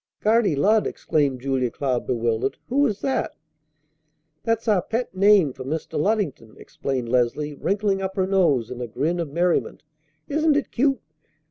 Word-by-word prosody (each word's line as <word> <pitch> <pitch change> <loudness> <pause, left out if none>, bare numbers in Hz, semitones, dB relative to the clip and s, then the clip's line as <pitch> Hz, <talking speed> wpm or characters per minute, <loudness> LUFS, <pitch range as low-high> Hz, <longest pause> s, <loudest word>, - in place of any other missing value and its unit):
"Guardy 215 -6 +3
Lud!" 210 +9 +3
exclaimed 140 -5 -1
Julia 130 -2 0
Cloud 130 -1 -2
bewildered. 115 +1 -1
"Who 280 +3 +3
is 210 -3 -4
that?" 270 - -1 1.1
"That's 230 0 -1
our 205 -4 +3
pet 230 +5 -3
name 190 -6 +4
for 130 - -8
Mr. 155 +4 -4
Luddington," 160 - -1
explained 130 -3 -4
Leslie, 125 +5 0
wrinkling 195 +5 0
up 190 0 -3
her 190 -2 +1
nose 170 - +2
in 125 0 -6
a 120 - -3
grin 155 +10 -1
of 165 -3 -2
merriment. 170 +4 0 0.4
"Isn't 305 0 +2
it 290 - -2
cute? 270 0 +1
175 Hz, 155 wpm, -23 LUFS, 130-215 Hz, 1.1 s, name